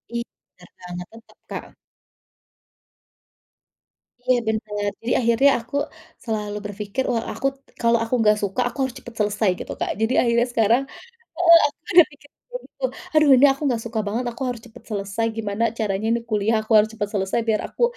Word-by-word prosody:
Iya 235 - -1 0.3
Kak, 180 0 -15 0.2
tetep, 225 +1 -17
Kak. - - -6 2.6
Iya 255 -1 +4
bener. 210 -2 -1
Jadi 235 - -3
akhirnya 235 +3 +4
aku 250 +5 -10 0.5
selalu 210 -2 -3
berpikir, 205 +4 -3
wah 230 -2 0
aku, 275 - -1 0.3
kalau 235 0 +4
aku 230 - -5
enggak 210 -1 +4
suka, 200 +4 -1
aku - - -14
harus 260 -2 -3
cepet 240 - -11
selesai 210 0 +1
gitu, - - -6
Kak. - - -2
Jadi 225 +3 +1
akhirnya 235 0 +2
sekarang 235 +2 +3 0.6
heeh, 335 -1 +8
aku 290 - -16 0.2
udah 345 -1 +10
mikir 285 0 -18
kayak - - -9
gitu, - - -11 0.3
"Aduh 305 -1 +5
ini 280 - +7
aku 275 - -10
nggak 235 -3 -1
suka 225 -1 -2
banget, 225 +5 -2
aku 240 +3 -8
harus 245 -2 -4
cepet 235 +1 -15
selesai, 200 +2 -2
gimana 215 0 -1
caranya 210 -1 -1
ini 235 +1 +1
kuliah 215 +1 +2
aku 215 - -3
harus 215 0 +5
cepet 210 -2 -3
selesai, 190 +2 0
biar 220 -2 +2
aku - - -6
225 Hz, 175 wpm, -22 LUFS, 210-245 Hz, 2.6 s, udah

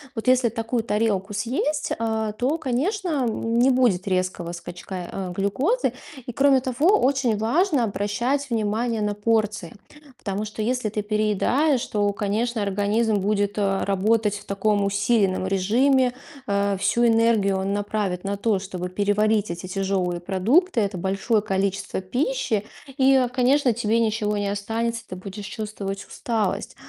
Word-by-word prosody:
Вот 225 +3 -5
если 255 -2 +4
такую 225 +1 -2
тарелку 210 -2 0
съесть, 255 +8 -1
э, 220 -1 -1
то, 275 +6 0
конечно, 335 - -1 0.2
н 230 +1 -1
не 255 - +5
будет 235 -8 +2
резкого 185 -2 -1
скачка, 175 +2 -8 0.2
э, 185 -2 -4
глюкозы. 265 - 0 0.3
И, - - -3
кроме 275 +1 +4
того, 285 - +3
очень 260 -5 +2
важно 285 - +2
обращать 235 +7 -1
внимание 225 +1 -1
на 210 0 0
порции. 215 -4 0 0.4
Потому 200 +1 -3
что 215 +1 -6
если 245 0 0
ты 210 0 -2
переедаешь, 215 +7 +1
то, 205 -1 +1
конечно, 220 +3 -1
организм 205 +3 +1
будет, 205 +1 0
э, 195 -1 +1
работать 205 +3 +2
в 205 - -9
таком 200 +1 +1
усиленном 200 -1 +1
режиме. 245 +7 +2 0.3
Э, 200 -1 +1
всю 235 +5 +2
энергию 225 -4 +3
он 195 +1 -1
направит 205 -3 -2
на 200 0 -2
то, 205 -2 +1
чтобы 185 -2 -5
переварить 205 +2 +1
эти 175 +2 -6
тяжёлые 185 -2 -1
продукты, 230 - +2
это 200 -2 -2
большое 195 +4 0
количество 195 -1 -2
пищи. 245 - -1 0.4
И, 265 +1 +5
э, 250 -2 +3
конечно, 255 0 +2
тебе 230 0 +1
ничего 215 -2 0
не 205 - -1
останется- 230 +3 -2
ты 185 - -5
будешь 195 +2 -8
чувствовать 205 -2 -5
усталость. 220 -5 -2
215 Hz, 145 wpm, -23 LUFS, 200-240 Hz, 0.4 s, не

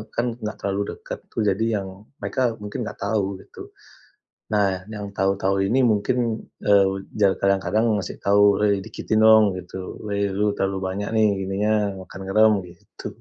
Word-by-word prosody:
kan 120 0 -1
nggak 105 -2 -4
terlalu 100 +1 -2
dekat - - -8
tuh, 110 - -1
jadi 100 +2 +1 0.2
yang 95 - -7 0.3
mereka 120 -3 -1
mungkin 105 0 -5
nggak - - -7
tahu 100 -1 +1 0.2
gitu. - - -12 0.8
Nah, 100 -3 +1
yang 105 -2 -7
tahu-tahu 95 0 +1
ini 130 +4 +2
mungkin, 115 +2 0 0.2
eee, 95 -1 +3 0.2
ja 100 - +7
kadang-kadang 100 +3 +1 0.2
ngasih - - -7
tahu, 100 +1 +4 0.2
"Wei 100 -2 +2
dikitin 110 0 -1
dong" 110 -2 +6
gitu. 95 +1 -8
"Wei 100 -1 -1
lu 105 +1 0
terlalu 95 0 0
banyak 100 +2 -3
nih, 110 -1 +4
gininya, 95 +3 0 0.3
makan 95 +1 -10
garam" 110 +3 +5
gitu. 85 -1 -11
100 Hz, 160 wpm, -23 LUFS, 95-110 Hz, 0.8 s, ja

